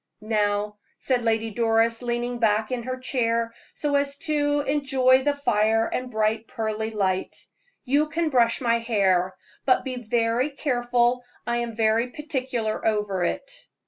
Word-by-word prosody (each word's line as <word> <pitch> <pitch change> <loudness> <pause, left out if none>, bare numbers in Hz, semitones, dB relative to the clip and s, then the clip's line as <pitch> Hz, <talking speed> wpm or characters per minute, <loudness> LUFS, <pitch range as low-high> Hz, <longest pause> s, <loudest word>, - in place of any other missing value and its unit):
"Now," 210 -1 0 0.2
said 255 -2 0
Lady 225 0 0
Doris, 230 +1 +2
leaning 240 0 -2
back 220 0 +1
in 250 -1 -1
her 255 +2 -4
chair 230 -3 0 0.2
so 295 -1 -1
as 280 0 0
to 290 -1 +1
enjoy 265 -2 +3
the 290 +1 +1
fire 225 -5 +2
and 255 +2 -3
bright 220 0 0
pearly 220 -2 -3
light, 190 -4 -1 0.5
"you 285 +4 +2
can 320 0 -1
brush 235 -2 +3
my 235 -2 +2
hair; 190 -5 +1 0.3
but 255 - +3
be 255 -1 -4
very 235 +3 +1
careful 245 -3 +1 0.2
I 240 0 0
am 235 -1 -3
very 225 +2 +2
particular 255 -6 -3
over 210 -4 0
it." - - -2
235 Hz, 145 wpm, -25 LUFS, 220-260 Hz, 0.5 s, enjoy